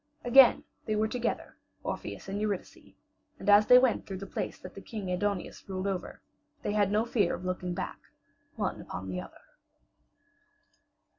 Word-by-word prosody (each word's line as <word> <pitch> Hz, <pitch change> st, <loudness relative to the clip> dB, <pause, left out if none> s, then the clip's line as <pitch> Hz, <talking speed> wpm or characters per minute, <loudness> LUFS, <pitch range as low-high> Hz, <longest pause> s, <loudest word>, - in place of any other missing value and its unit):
Again 245 Hz, 0 st, +7 dB, 0.2 s
they 215 Hz, -, +1 dB
were 215 Hz, +1 st, +2 dB
together, 240 Hz, +2 st, -3 dB, 0.3 s
Orpheus -, -, -5 dB
and 200 Hz, +2 st, -3 dB
Eurydice, 205 Hz, -3 st, -4 dB, 0.4 s
and -, -, -9 dB
as 205 Hz, +1 st, +7 dB
they 250 Hz, -, +9 dB
went 250 Hz, -2 st, +2 dB
through 195 Hz, -, -5 dB
the 195 Hz, -, -7 dB
place -, -, -4 dB
that 185 Hz, -, -10 dB, 0.2 s
King 205 Hz, -5 st, -4 dB
Aidoneus 200 Hz, +1 st, -2 dB
ruled 185 Hz, 0 st, -3 dB
over, 195 Hz, -2 st, -4 dB, 0.4 s
they 205 Hz, -, -1 dB
had 205 Hz, -2 st, +2 dB
no 215 Hz, +2 st, +2 dB
fear 210 Hz, -6 st, +1 dB
of 185 Hz, -, -9 dB
looking 180 Hz, -1 st, -2 dB
back, -, -, -4 dB, 0.6 s
one -, -, -2 dB
upon 95 Hz, +1 st, -7 dB
the 90 Hz, -1 st, -3 dB
other. 90 Hz, -, -13 dB
205 Hz, 160 wpm, -30 LUFS, 185-215 Hz, 0.6 s, they